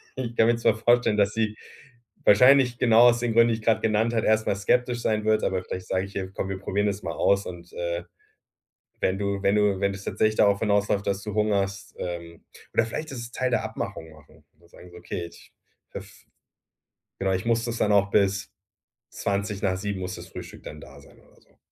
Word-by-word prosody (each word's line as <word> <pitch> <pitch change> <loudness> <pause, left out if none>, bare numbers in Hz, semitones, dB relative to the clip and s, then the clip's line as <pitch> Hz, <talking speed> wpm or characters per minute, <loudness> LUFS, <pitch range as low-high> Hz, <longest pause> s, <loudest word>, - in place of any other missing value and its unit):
ich 120 -3 -5
kann 110 - +5
mir 120 - +3
zwar 115 -2 +2
vorstellen, 120 -2 +3
dass 100 0 +2
sie 110 -1 -1 0.7
wahrscheinlich 125 +3 +6
genau 115 -2 +5
aus 120 - +1
den 120 -1 -1
Gründen, 115 +1 +5
die 115 - +1
ich 110 - -8
grad 115 - +2
genannt 110 +2 +1
hat, 115 - 0
erst 110 0 +2
mal - - +1
skeptisch 120 +4 0
sein 110 -1 0
wird, 110 0 +2
aber 95 -1 -1
vielleicht 90 0 -7
sage 95 0 -1
ich 100 - -13
ihr: 95 -1 -4
„Komm, 95 - -4
wir 95 -1 -4
probieren 100 +1 -1
es 100 0 -2
mal - - -3
aus 100 0 +2
und, 85 -1 -10
äh, 85 0 -3 1.0
wenn 95 +1 +1
du 100 -1 -2
wenn 100 - +3
du 105 -2 +2
wenn 100 0 +2
das 95 +1 -9
tatsächlich 110 0 +1
darauf 100 -1 +4
hinausläuft, 100 -1 +1
dass 100 0 -1
du 105 - -5
hungerst“ 100 -2 -1
ähm, 85 -1 -6 0.3
oder - - +3
vielleicht 155 +7 -5
das 120 -2 -7
Teil 130 +1 -1
der 125 - +1
Abmachung 80 - -6
machen. 75 -1 -20
Da 85 - -23
sagen 90 - -15
sie - - -19
so: - - -11
„Okay, 85 0 -5
ich 85 - -18 0.4
höff - - -9 1.1
genau, 95 0 0
ich 95 +3 -2
muss 115 0 +1
das 120 -1 -3
dann 105 - +1
auch 100 0 +3
bis 100 -1 +1 0.6
7:20 100 -1 -2
muss 90 0 -5
das - - -10
Frühstück - - -10
dann 75 - -9
da 70 0 -13
sein 70 - -19
oder - - -25
so. - - -30
100 Hz, 215 wpm, -25 LUFS, 95-115 Hz, 1.1 s, wahrscheinlich